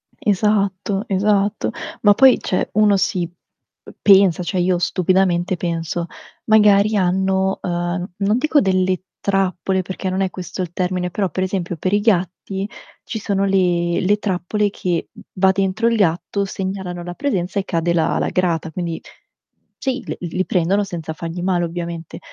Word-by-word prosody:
Esatto, 200 -1 0
esatto. 205 +1 +1 0.3
Ma 205 -1 +6
poi, 265 +3 +6
cioè 185 - -1
uno 210 -1 +4
si 185 -2 0
p - - -24 0.7
pensa, 195 -3 +5
cioè 180 +1 -2
io 180 0 +2
stupidamente 185 0 +1
penso. 170 0 -3 0.4
Magari 210 -1 +5
hanno, 190 0 +1
ehm, 175 +1 -2
non 205 +2 +1
dico 305 +3 +3
delle 185 -1 +1 0.2
trappole 190 -1 0
perché 185 +1 -4
non 185 +1 -1
è 190 - +1
questo 185 +1 -6
il 175 - -4
termine, 180 -1 -1
però 195 -1 -1
per 185 +4 -2
esempio 180 -3 -3
per 185 +5 -1
i 205 - +4
gatti 190 -1 0 0.4
ci 220 - -5
sono 200 -1 0
le 175 -3 +1
le 205 +3 +2
trappole 205 +1 -1
che, 175 -4 -2 0.2
va 190 0 +4
dentro 195 +4 0
il 235 - +2
gatto, 200 +2 0
segnalano 190 -2 -4
la 175 0 -6
presenza 200 -7 -1
e 190 - -3
cade 170 0 0
la 165 -2 +1
la - - 0
grata, 170 -3 0
quindi 170 -1 -4 0.8
sì 265 -2 -2
l - - -4
li 180 +2 -2
prendono 190 +3 +1
senza 165 -4 -5
fargli 165 +2 -6
male, 180 -1 +1
ovviamente. 170 -1 -6
185 Hz, 160 wpm, -20 LUFS, 175-200 Hz, 0.8 s, Ma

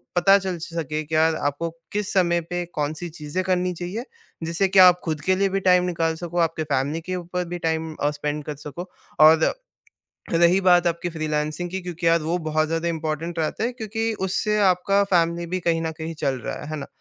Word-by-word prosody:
पता 195 +3 +6
चल 185 -2 -3
सके, 155 -2 -4
कि 155 +1 -4
यार, 160 0 +3
आपको 145 +4 -2 0.2
किस 210 -1 0
समय 175 -2 +2
पे 175 0 -2
कौन-सी 155 +3 -3
चीज़ें 150 +5 -3
करनी 180 0 0
चाहिए। 180 +7 -5 0.4
जिससे 170 +4 +1
कि 195 0 +3
आप 180 -1 +8
खुद 155 -3 -3
के 185 +4 +2
लिए 195 0 +1
भी 195 +1 0
टाइम 180 -1 +4
निकाल 165 -2 0
सको, 175 +1 -6
आपके 165 -1 +1
फैमिली 145 +2 -1
के 185 +3 -4
ऊपर 180 0 -3
भी 175 0 -4
टाइम 160 0 -2
अ, 145 - 0
स्पेंड 150 0 -3
कर 150 - -5
सको। 175 +5 -7 0.3
और, 160 +1 +6 0.8
रही 170 +3 +4
बात 175 -1 +5
आपकी 170 +1 -1
फ्रीलांसिंग 155 +2 -2
की, 190 +1 -3
क्योंकि 175 -1 -4
यार 165 0 +4
वो 165 +3 0
बहुत 155 0 +2
ज़्यादा 165 +1 -1
इंपॉर्टेंट 165 +1 -3
रहता 160 +7 -1
है, 245 - -1
क्योंकि 225 -1 -3 0.2
उससे 210 +3 0
आपका 195 +3 +1
फैमिली 170 0 +2
भी 185 +2 -3
कहीं 165 -1 +1
न 160 - -1
कहीं 160 +1 -5
चल 140 -2 +1
रहा - - -4
है, 150 - -8
है 155 - -3
ना? 140 - -6
170 Hz, 210 wpm, -23 LUFS, 155-180 Hz, 0.8 s, आप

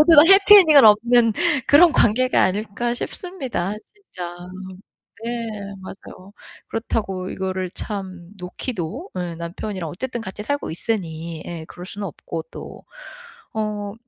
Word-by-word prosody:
모두가 305 -1 +8
해피 395 +1 +9
엔딩은 310 - +7
없는 230 +2 +5 0.3
그런 325 +3 +6
관계가 255 +4 +3
아닐까 215 +5 -1
싶습니다. 255 - -4 0.2
진짜. 180 - -9 0.9
네 235 - -3 0.5
맞아요. 190 0 -12 0.4
그렇다고 195 -5 -3
이거를 185 -1 -3
참 185 -4 -6
놓기도 195 - -5
예 175 -2 -4
남편이랑 170 +1 -5
어쨌든 240 - -5
같이 210 0 -7
살고 285 +5 -2
있으니. 165 -4 -4
예. 165 -2 -6
그럴 180 0 -10
수는 200 +1 -6
없고 165 0 -7
또. - - -10 0.7
어. 210 -2 -3
205 Hz, 270 characters per minute, -21 LUFS, 180-245 Hz, 0.9 s, 해피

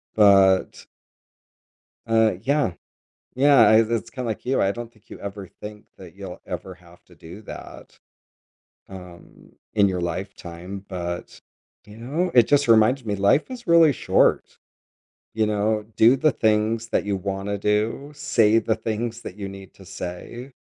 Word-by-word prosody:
but 95 -3 +4 1.2
Uh, 110 -1 +3
yeah 140 -5 0 0.6
yeah, 140 +1 +4
i 110 - +6
it's 115 0 0
kinda 125 0 -6
like 110 - -5
you, 130 +2 +1
I 95 - +2
don't 120 0 -8
think 110 -3 -28
you - - -10
ever 100 -1 -7
think 105 0 -9
that 90 -2 -13
you'll 95 -2 -9
ever 95 -1 -7
have 85 0 -20
to 90 - -20
do 85 +6 -12
that, - - -11 0.9
um, 90 -2 -13 0.2
in 100 -2 +4
your 90 -2 -2
lifetime, 90 +1 -6
but, 85 -2 -6 0.5
you 105 0 -13
know, 150 +10 -2
it 120 -3 +5
just 145 0 +3
reminds 115 +3 +4
me 105 -2 -2
life 100 - +2
is 240 -6 -10
really 165 -3 +6
short, - - +1 0.8
you 110 -1 +1
know, 105 0 -1
do 115 +3 +6
the 155 +3 +2
things 110 -1 0
that - - 0
you 100 -1 -1
wanna 100 +1 -4
do, 105 +8 -1
say 115 -7 +2
the 110 0 0
things 115 +1 -4
that 90 - -9
you 100 -2 -6
need 95 -1 -11
to 95 - -16
say, 100 +9 -8
105 Hz, 155 wpm, -23 LUFS, 95-120 Hz, 1.2 s, i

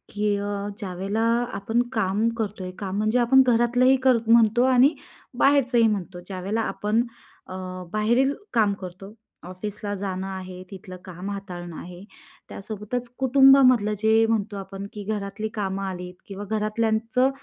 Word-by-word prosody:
की 210 0 +1
अ, 205 0 -3 0.3
ज्यावेळेला 195 +2 -3 0.3
आपण 225 +4 0
काम 215 0 +1
करतो 205 -4 -3
आहे, 185 - -5
काम 195 -1 -4
म्हणजे 215 +4 +1
आपण 255 +3 +5
घरातलंही 245 +2 +4
कर 260 -2 +5
म्हणतो 230 +1 +5
आणि 260 +5 +5 0.5
बाहेरचंही 255 -5 +4
म्हणतो. 190 -4 -3
ज्यावेळेला 195 +3 -2
आपण 215 +1 0 0.5
अ, - - -8 0.4
बाहेरील 235 +6 +2 0.2
काम 215 -4 +3
करतो, 185 +2 -9 0.3
ऑफिसला 205 +3 -6
जाणं 190 -1 -4
आहे, 185 -1 -7
तिथलं 185 -1 -9
काम 185 +1 -7
हाताळणं 180 -4 -7
आहे. 180 +1 -10 0.5
त्यासोबतच 215 +4 -5
कुटुंबामधलं 265 -4 +5
जे 220 +2 +3
म्हणतो 215 -2 -1
आपण 195 0 -7
की 210 - -7
घरातली 205 0 -3
कामं 195 -2 -3
आलीत 180 -2 -5
किंवा 200 0 -7
घरातल्यांचं 220 +4 0
210 Hz, 140 wpm, -24 LUFS, 195-230 Hz, 0.5 s, आपण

